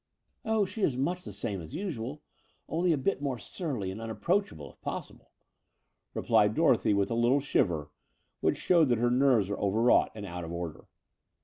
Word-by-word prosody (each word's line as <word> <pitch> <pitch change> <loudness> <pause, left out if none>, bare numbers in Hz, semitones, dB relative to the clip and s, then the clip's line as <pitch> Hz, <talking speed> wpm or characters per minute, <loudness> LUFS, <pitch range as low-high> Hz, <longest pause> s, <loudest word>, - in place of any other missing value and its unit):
"Oh, 220 -2 +2
she 215 +3 -7
is 135 -9 +1
much 175 +7 -1
the - - -7
same 100 -4 -4
as 85 - -9
usual, 150 - -4 0.4
only 175 +2 +1
a 155 - +2
bit 145 +4 -1
more 135 -3 -1
surly 125 - -4
and 105 +4 -7
unapproachable, 115 - -1
if - - -30
possible," - - -6 0.9
replied - - +3
Dorothy, 105 - +3
with 100 +3 +1
a - - +1
Uttle 120 +4 +3
shiver, 85 - 0 0.5
which - - +1
showed 170 -3 +4
that 120 -2 +2
her 120 +2 +2
nerves 125 -5 +4
were 100 - -3
overwrought 110 +5 +3
and 105 -2 -6
out 90 -2 -6
of 85 - -6
order. 85 -2 -5
120 Hz, 180 wpm, -29 LUFS, 100-160 Hz, 0.9 s, showed